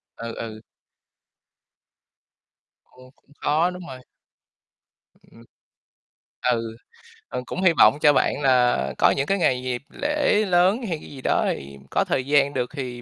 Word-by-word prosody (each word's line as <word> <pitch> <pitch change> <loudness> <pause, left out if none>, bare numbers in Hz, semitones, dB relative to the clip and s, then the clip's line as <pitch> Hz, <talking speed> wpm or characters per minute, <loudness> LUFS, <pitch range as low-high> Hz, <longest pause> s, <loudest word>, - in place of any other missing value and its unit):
Ừ, 115 0 -7
ừ. 110 -1 -7 2.3
Ừm, 130 0 -17
cũng 145 - -32
khó, 160 +4 +2
đúng 180 -1 -9
rồi. 130 -1 -9 1.3
Ừm. 115 - -17 1.1
Ừ. 115 -1 -2 0.5
Ừm, 125 - -5
cũng 185 - -5
hy 180 -3 +4
vọng 145 - +6
cho 145 -1 +6
bạn 145 - +1
là 125 - +2
có - - +4
những 135 - 0
cái 195 - +1
ngày 130 -8 +1
dịp 125 -1 -3 0.2
lễ 290 -7 +2
lớn 180 +4 +3
hay 165 -4 -2
cái - - -12
gì 135 -2 -10
đó - - +1
thì 70 0 -10
có - - +2
thời 130 -1 -1
gian 140 0 +2
được 125 - -2
thì 125 -3 -6
135 Hz, 150 wpm, -23 LUFS, 120-170 Hz, 2.3 s, vọng